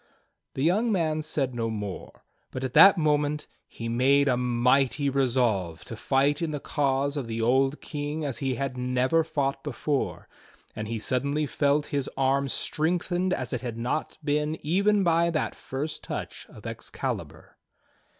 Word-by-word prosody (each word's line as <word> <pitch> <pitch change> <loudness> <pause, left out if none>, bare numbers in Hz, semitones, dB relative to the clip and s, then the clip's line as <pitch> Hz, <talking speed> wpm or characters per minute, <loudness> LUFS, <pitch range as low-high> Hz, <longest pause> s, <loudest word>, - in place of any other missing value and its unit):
The 135 - -1
young 210 +8 +2
man 160 -5 +1
said 145 -4 -1
no 115 -1 -2
more, 105 -3 -6 0.2
but 130 - -5
at 130 -1 -3
that 195 0 +9
moment 150 -1 +1 0.2
he 115 - -7
made 135 +4 +3
a 125 - +3
mighty 125 +3 +2
resolve 120 -11 0
to 115 - -7
fight 140 +5 +1
in 165 - 0
the 150 -1 -3
cause 140 0 0
of 135 -5 -3
the 115 0 -3
old 135 +5 +2
King 150 0 -4
as 135 -5 -3
he 135 -2 -1
had 130 0 -3
never 125 +6 +2
fought 145 -4 -2
before; 145 0 -2 0.5
and 110 0 -4
he 115 +1 -3
suddenly 140 +7 0
felt 145 +1 +1
his 140 -2 -2
arm 135 +1 +2
strengthened 175 +6 -1
as 130 -9 -2
it 125 - -2
had 120 -3 -5
not 125 +6 -2
been 150 +1 0
even 200 +5 +3
by 170 -1 +3
that 155 -2 -1
first 145 +4 -5
touch - - -6
of - - -14
Excalibur. - - -5
140 Hz, 160 wpm, -27 LUFS, 125-155 Hz, 0.5 s, that